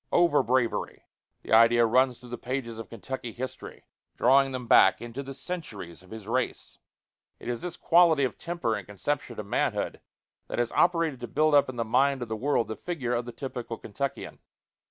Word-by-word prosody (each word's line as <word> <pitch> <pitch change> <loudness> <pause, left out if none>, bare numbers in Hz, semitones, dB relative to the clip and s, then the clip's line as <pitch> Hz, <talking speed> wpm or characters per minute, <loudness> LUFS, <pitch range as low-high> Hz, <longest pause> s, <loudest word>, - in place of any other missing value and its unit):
Over 170 -4 +4
bravery! 125 -1 -1 0.4
The - - -3
idea 115 +1 +6
runs 125 +2 +2
through 125 0 -13
the 120 - -4
pages 120 -3 -4
of 115 - -8
Kentucky 120 +1 -6
history, 130 +1 -7 0.3
drawing 135 0 +4
them 130 -1 -5
back - - +6
into 120 +3 -6
the 135 0 -8
centuries 135 - -7
of 90 - -19
his 110 -2 -9
race. 125 +2 -3 0.6
It - - -10
is 120 -1 -3
this 180 - -5
quality 165 -4 +4
of 130 - -1
temper 170 -10 -2
and 105 -3 -5
conception 120 +4 -3
of 105 - -5
manhood 100 - -1 0.5
that - - -5
has 120 -1 0
operated 165 -6 +2
to 120 - -6
build 155 +6 +2
up 140 -2 +5
in 130 - -6
the 115 -1 -2
mind 130 +3 +2
of 120 - -9
the 110 - -2
world 120 -1 0
the 110 - -3
figure 135 -8 -3
of 120 0 -1
the 120 - -6
typical 120 -2 -6
Kentuckian. 140 +6 -5
125 Hz, 195 wpm, -27 LUFS, 115-140 Hz, 0.6 s, idea